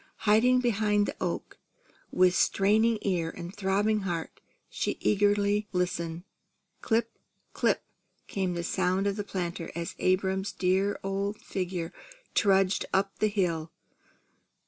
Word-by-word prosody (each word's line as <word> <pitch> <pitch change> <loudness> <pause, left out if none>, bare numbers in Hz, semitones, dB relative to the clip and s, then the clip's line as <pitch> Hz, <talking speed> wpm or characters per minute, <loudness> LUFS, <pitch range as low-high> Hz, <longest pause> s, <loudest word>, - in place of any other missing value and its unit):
Hiding 245 +4 +5
behind 210 -3 +2
the - - -4
oak, - - -3 0.5
with 180 0 +4
straining 215 +5 +3
ear 175 -4 0
and 175 +4 -8
throbbing 205 +2 +1
heart, 175 -5 -4 0.3
she - - -2
eagerly 205 0 +2
listened. 170 -2 -2 0.6
"Clip, 230 0 +1 0.5
clip," - - +1 0.4
came 185 -3 -2
the 170 - -2
sound 185 +2 0
of 200 -1 +1
the 205 - -3
planter, 175 -4 -4
as 170 +2 -4
Abram's 190 +1 +1
dear 190 +2 +1
old 200 +2 -2
figure 180 -2 -4 0.4
trudged 195 -2 +3
up 195 +1 0
the 215 - +3
hill. 170 -6 -1
195 Hz, 125 wpm, -28 LUFS, 180-205 Hz, 0.6 s, Hiding